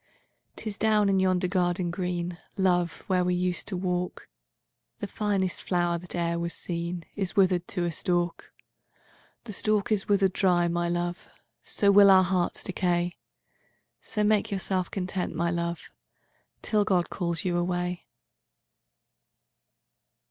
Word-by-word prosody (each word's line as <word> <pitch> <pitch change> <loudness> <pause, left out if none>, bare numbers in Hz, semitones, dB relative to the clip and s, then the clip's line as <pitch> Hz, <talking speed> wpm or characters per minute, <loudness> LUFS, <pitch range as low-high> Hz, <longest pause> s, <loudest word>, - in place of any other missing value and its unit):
VI''Tis 215 -2 -6
down 210 -2 +3
in 195 -1 +3
yonder 185 -1 +2
garden 180 -1 0
green, 175 -1 -3 0.2
Love, 180 -3 +1
where 185 -1 +2
we 180 0 +1
used 180 0 -1
to 190 - -3
walk, 180 -1 -3 0.7
The - - -4
finest 200 -4 -1
flower 175 -1 0
that 180 +1 -6
ere 170 -1 0
was 170 0 -3
seenIs 175 +3 -4
wither'd 185 -3 +3
to 180 -3 -2
a 170 - -1
stalk. 175 +1 -1 0.9
VII'The 220 - -6
stalk 215 +1 0
is 210 -1 0
wither'd 195 -2 +3
dry, 175 -3 +3
my 170 0 0
love, 175 +1 -3 0.3
So 200 -1 +2
will 200 0 +8
our 190 -1 +7
hearts 180 -1 0
decay; 175 -1 -1 0.8
So 210 - -2
make 210 0 +2
yourself 190 -2 -1
content, 185 -2 -3
my 170 +1 0
love, 170 0 -3 0.7
Till 210 -1 +2
God 185 -4 +1
calls 170 -2 -2
you 175 -1 0
away. 175 -1 -2
180 Hz, 135 wpm, -27 LUFS, 175-195 Hz, 0.9 s, will